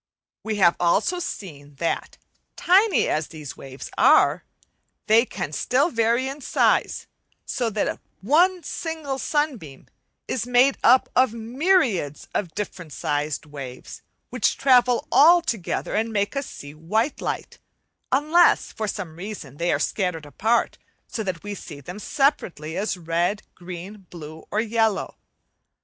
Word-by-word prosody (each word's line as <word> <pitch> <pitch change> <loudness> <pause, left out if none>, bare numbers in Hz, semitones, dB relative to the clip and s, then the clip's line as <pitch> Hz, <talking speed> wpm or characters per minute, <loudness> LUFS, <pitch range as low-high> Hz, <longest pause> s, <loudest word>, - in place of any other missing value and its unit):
We 220 -1 -2
have 180 -4 +4
also 260 - +2
seen 145 - -7
that, 165 +4 -3 0.4
tiny 390 +3 +4
as 155 0 -1
these 155 -4 -9
waves 135 0 -10
are, - - +5 0.6
they 225 +3 +4
can 145 - -5
still 275 - +1
vary 235 +2 +1
in 275 +2 -6
size, - - +1 0.4
so 240 -2 -1
that 215 -1 -2 0.2
one 345 - +3
single 305 -3 -4
sunbeam 260 - -2 0.4
is 240 -1 -2
made 250 +2 +4
up 255 +2 +6
of 255 -3 +3
myriads 235 - 0
of 175 -6 -3
different 180 -6 -6
sized 150 +1 -2
waves, 135 -4 -9 0.3
which 245 -6 +1
travel 250 0 +4
all 340 +4 +7
together 230 - -3
and 225 +2 0
make 205 +3 -1
us 275 0 -2
see 145 0 -10
white 215 - -1
light; - - -4 0.5
unless 310 +6 +4
for 215 - -4
some 180 -5 -5
reason 175 - -8
they 170 +2 0
are - - +2
scattered 180 -6 -2
apart, 220 +10 0 0.3
so 225 - -5
that 185 -5 -4
we 205 0 -5
see 160 -6 -9
them 180 +8 -9
separately 180 - 0
as 200 -1 -1
red, 175 +5 -1
green, 185 +2 -9
blue, 160 -2 -10
or 210 - -1
yellow. 225 -2 0
210 Hz, 140 wpm, -24 LUFS, 165-260 Hz, 0.6 s, all